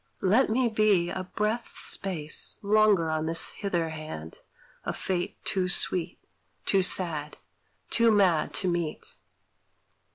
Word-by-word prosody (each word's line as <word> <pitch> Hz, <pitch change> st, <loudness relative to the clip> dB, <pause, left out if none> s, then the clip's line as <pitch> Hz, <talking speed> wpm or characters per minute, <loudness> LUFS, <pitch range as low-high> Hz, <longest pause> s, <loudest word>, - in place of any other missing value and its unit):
Let 215 Hz, +8 st, +4 dB
me 245 Hz, +3 st, +2 dB
be 210 Hz, -6 st, +2 dB
A 185 Hz, -, -3 dB
breath's 215 Hz, +5 st, -3 dB
space 165 Hz, -6 st, -1 dB
longer 205 Hz, -5 st, +3 dB
on 155 Hz, 0 st, -1 dB
this 165 Hz, 0 st, +1 dB
hither 175 Hz, -6 st, -2 dB
hand 155 Hz, -, -8 dB, 0.4 s
Of -, -, -3 dB
fate 180 Hz, -2 st, -2 dB
too 185 Hz, -2 st, 0 dB
sweet, 180 Hz, -1 st, 0 dB, 0.5 s
too 195 Hz, -, +3 dB
sad, 160 Hz, -5 st, 0 dB, 0.5 s
too 230 Hz, 0 st, +4 dB
mad 190 Hz, -7 st, +3 dB
to 190 Hz, -, 0 dB
meet. 170 Hz, -3 st, -3 dB
185 Hz, 125 wpm, -27 LUFS, 160-210 Hz, 0.5 s, Let